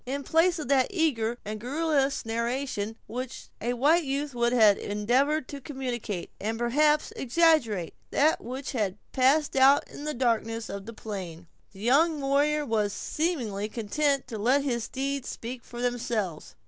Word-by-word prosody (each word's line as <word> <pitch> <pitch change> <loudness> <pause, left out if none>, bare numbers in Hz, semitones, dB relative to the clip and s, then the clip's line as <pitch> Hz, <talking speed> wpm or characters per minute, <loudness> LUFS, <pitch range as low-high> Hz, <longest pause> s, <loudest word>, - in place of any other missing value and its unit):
In 280 +2 -3
place 335 +4 +3
of 305 - -5
that 265 -2 +4
eager 250 - 0
and 215 +1 -4
garrulous 275 +1 0
narration 230 -1 -2
with 250 +2 -3
which - - -11
a 240 +2 0
white 300 +8 +3
youth 280 0 -2
would 235 0 +1
have 220 -5 +5
endeavored 255 +8 +1
to 285 -1 -7
communicate, 245 - -4
and 220 +3 -2
perhaps 295 +6 +2
exaggerate, 255 - +2 0.2
that 310 +3 +2
which 260 +3 -5
had 205 -6 -1
passed 275 +4 +3
out 270 +2 +5
in 290 - -9
the 300 - -2
darkness 230 -2 0
of 200 +1 -6
the 230 - -7
plain, 185 -6 -7 0.3
the 195 - -13
young 300 +7 +3
warrior 290 +2 +2
was 215 -4 0
seemingly 235 - -2
content 275 +6 0
to 225 -3 -6
let 260 +6 +3
his 240 -5 -1
deeds 275 0 -3
speak 240 +1 -6
for 240 0 -7
themselves. 225 -9 -2
250 Hz, 160 wpm, -27 LUFS, 225-285 Hz, 0.3 s, have